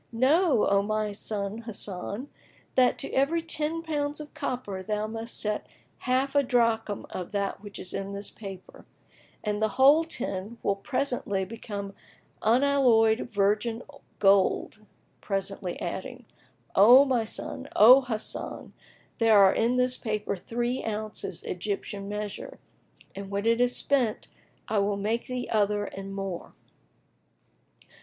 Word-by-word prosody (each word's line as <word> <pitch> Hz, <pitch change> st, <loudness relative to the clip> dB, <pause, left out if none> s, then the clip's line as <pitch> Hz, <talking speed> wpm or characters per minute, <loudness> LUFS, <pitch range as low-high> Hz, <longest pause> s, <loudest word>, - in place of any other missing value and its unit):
Know, 275 Hz, -, +3 dB
O 200 Hz, 0 st, +3 dB
my 215 Hz, +1 st, -1 dB
son 205 Hz, +1 st, -4 dB
Hasan, 210 Hz, +1 st, -4 dB, 0.5 s
that 250 Hz, -1 st, +4 dB
to -, -, -2 dB
every 315 Hz, +5 st, +2 dB
ten 325 Hz, 0 st, -2 dB
pounds 295 Hz, -2 st, -2 dB
of 300 Hz, -1 st, -9 dB
copper 205 Hz, -7 st, -4 dB
thou 210 Hz, +2 st, -2 dB
must 225 Hz, +1 st, -4 dB
set 210 Hz, 0 st, -2 dB, 0.4 s
half 260 Hz, +2 st, +2 dB
a 285 Hz, -, +5 dB
drachm 230 Hz, -5 st, +1 dB
of 180 Hz, -2 st, -6 dB
that 200 Hz, -1 st, -2 dB
which 205 Hz, -1 st, -8 dB
is 180 Hz, -, -6 dB
in 195 Hz, 0 st, -4 dB
this 200 Hz, +1 st, -4 dB
paper, 195 Hz, -3 st, -10 dB, 0.6 s
and 210 Hz, 0 st, -2 dB
the 220 Hz, +3 st, 0 dB
whole 285 Hz, +5 st, +7 dB
ten 225 Hz, -, -5 dB
will 200 Hz, -, +1 dB
presently 245 Hz, -4 st, -2 dB
become 200 Hz, -2 st, -6 dB, 0.5 s
unalloyed 240 Hz, -2 st, +3 dB
virgin 215 Hz, +3 st, 0 dB, 0.3 s
gold;" 200 Hz, +2 st, +2 dB, 0.4 s
presently 195 Hz, -2 st, -3 dB
adding, 245 Hz, +8 st, -5 dB, 0.5 s
"O 245 Hz, +8 st, +8 dB
my 255 Hz, -4 st, +1 dB
son, 220 Hz, -, -6 dB
O 250 Hz, +6 st, +9 dB
Hasan, 230 Hz, -4 st, -4 dB, 0.5 s
there 225 Hz, -2 st, +5 dB
are 195 Hz, -1 st, +7 dB
in 235 Hz, +3 st, +1 dB
this 250 Hz, 0 st, +2 dB
paper 215 Hz, -2 st, -2 dB
three 240 Hz, +6 st, -3 dB
ounces,[FN#22] 215 Hz, -1 st, -4 dB
Egyptian 200 Hz, +2 st, -4 dB
measure, 210 Hz, 0 st, -5 dB, 0.6 s
and 195 Hz, 0 st, -7 dB
when 200 Hz, +1 st, -2 dB
it 230 Hz, +1 st, +3 dB
is 245 Hz, 0 st, +3 dB
spent, 250 Hz, -6 st, 0 dB, 0.4 s
I 215 Hz, -, +1 dB
will 200 Hz, 0 st, 0 dB
make 220 Hz, +5 st, -2 dB
thee 250 Hz, -1 st, -4 dB
other 205 Hz, -1 st, +1 dB
and 195 Hz, 0 st, -7 dB
more." 195 Hz, -3 st, -5 dB
220 Hz, 135 wpm, -27 LUFS, 200-250 Hz, 0.6 s, O